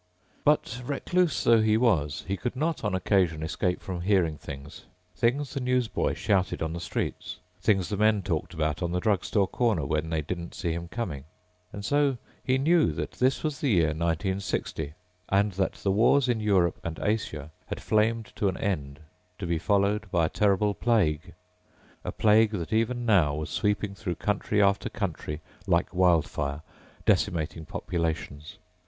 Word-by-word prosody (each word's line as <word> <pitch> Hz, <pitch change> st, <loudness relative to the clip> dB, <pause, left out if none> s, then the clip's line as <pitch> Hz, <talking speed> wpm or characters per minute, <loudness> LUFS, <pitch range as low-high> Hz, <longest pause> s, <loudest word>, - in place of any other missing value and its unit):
But 145 Hz, -5 st, +2 dB
recluse 160 Hz, +5 st, 0 dB
though 115 Hz, -1 st, +5 dB
he 110 Hz, 0 st, +3 dB
was, 80 Hz, -, +1 dB
he 100 Hz, -, 0 dB
could 125 Hz, +5 st, -4 dB
not 155 Hz, +2 st, -1 dB
on 105 Hz, -3 st, 0 dB
occasion 90 Hz, -4 st, +1 dB
escape 90 Hz, +3 st, -1 dB
from 90 Hz, -2 st, -4 dB
hearing 90 Hz, -4 st, +2 dB
things. 70 Hz, 0 st, -9 dB, 0.3 s
Things 135 Hz, +5 st, 0 dB
the 140 Hz, -, -2 dB
newsboy 125 Hz, -2 st, 0 dB
shouted 95 Hz, -5 st, 0 dB
on 80 Hz, 0 st, -2 dB
the 85 Hz, -, -4 dB
streets, 85 Hz, -, -4 dB, 0.2 s
things 95 Hz, -3 st, +2 dB
the 100 Hz, -, -2 dB
men 105 Hz, -1 st, +3 dB
talked 85 Hz, -2 st, -2 dB
about 75 Hz, 0 st, -1 dB
on 85 Hz, -1 st, -1 dB
the 90 Hz, -, +1 dB
drugstore 100 Hz, 0 st, +1 dB
corner 110 Hz, -, 0 dB
when 75 Hz, +3 st, -1 dB
they 80 Hz, -2 st, -1 dB
didn't 85 Hz, +2 st, -5 dB
see 85 Hz, -2 st, -2 dB
him 85 Hz, +1 st, -5 dB
coming. 85 Hz, -, -4 dB, 0.5 s
And 100 Hz, 0 st, -7 dB
so 145 Hz, -1 st, +2 dB, 0.3 s
he 130 Hz, 0 st, +2 dB
knew 160 Hz, +4 st, +3 dB
that -, -, -4 dB
this 130 Hz, +1 st, +1 dB
was 150 Hz, -4 st, -2 dB
the 140 Hz, -, 0 dB
year 85 Hz, -7 st, +4 dB
1960 85 Hz, -1 st, -2 dB, 0.3 s
and 100 Hz, +2 st, +3 dB
that 95 Hz, +1 st, -1 dB
the 100 Hz, -, -1 dB
wars 120 Hz, +6 st, +4 dB
in 120 Hz, -2 st, +1 dB
Europe 95 Hz, -5 st, +2 dB
and 80 Hz, -2 st, -5 dB
Asia 80 Hz, -9 st, -2 dB, 0.2 s
had -, -, -4 dB
flamed 110 Hz, 0 st, +1 dB
to 100 Hz, -, +1 dB
an 95 Hz, -, -4 dB
end 75 Hz, -8 st, -3 dB, 0.4 s
to 95 Hz, -, -5 dB
be 85 Hz, -1 st, 0 dB
followed 100 Hz, +2 st, +1 dB
by 85 Hz, -3 st, +2 dB
a -, -, -1 dB
terrible 105 Hz, 0 st, +2 dB
plague, 90 Hz, -8 st, +1 dB, 0.7 s
a -, -, -3 dB
plague 110 Hz, 0 st, +4 dB
that 90 Hz, 0 st, -3 dB
even 120 Hz, +2 st, +1 dB
now 90 Hz, -10 st, +4 dB
was 75 Hz, 0 st, -4 dB
sweeping 105 Hz, -1 st, 0 dB
through 100 Hz, -3 st, -4 dB
country 105 Hz, 0 st, 0 dB
after 100 Hz, 0 st, +2 dB
country 80 Hz, -6 st, -4 dB, 0.3 s
like 85 Hz, -2 st, +1 dB
wild 90 Hz, -3 st, +4 dB
fire, 70 Hz, +1 st, -3 dB, 0.4 s
decimating 80 Hz, -1 st, +1 dB
populations. 80 Hz, -2 st, -3 dB
95 Hz, 170 wpm, -27 LUFS, 80-110 Hz, 0.7 s, though